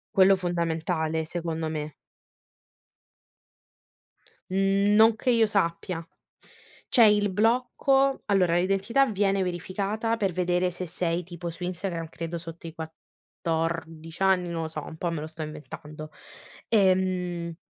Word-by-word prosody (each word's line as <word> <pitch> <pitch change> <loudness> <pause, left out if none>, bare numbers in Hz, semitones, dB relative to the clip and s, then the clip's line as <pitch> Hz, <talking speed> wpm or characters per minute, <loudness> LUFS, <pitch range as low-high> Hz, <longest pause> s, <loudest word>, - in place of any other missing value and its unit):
Quello 195 0 +7
fondamentale, 165 -2 -1
secondo 165 -1 -3
me. 150 -1 -4 2.6
Mhmm, 195 +2 +2
non 220 +1 +6
che 250 - -2
io 230 -2 +4
sappia. 170 -3 -1 0.8
C'è 235 - +6
il 205 -1 +4
blocco 255 +5 +2
allora, 185 -4 +3
l'identità 195 +9 +2
viene 195 -2 +1
verificata 200 +5 -2
per 195 -4 0
vedere 180 +1 +1
se 180 +1 -5
sei, 175 0 -2
tipo, 175 0 -7
su 170 +2 -8
Instagram 175 -2 -3
credo 170 +1 -5
sotto 165 0 -9
i 160 - -8
14 165 +1 -5
anni, 185 -2 +3
non 165 -1 -3
lo - - -3
so, 155 -2 -6
un 160 - -9
po' 170 +1 -2
me 155 -2 -3
lo 155 - -5
sto 160 0 -10
inventando. 155 0 -9 0.6
Ehm 185 -4 +1
175 Hz, 130 wpm, -26 LUFS, 165-195 Hz, 2.6 s, Quello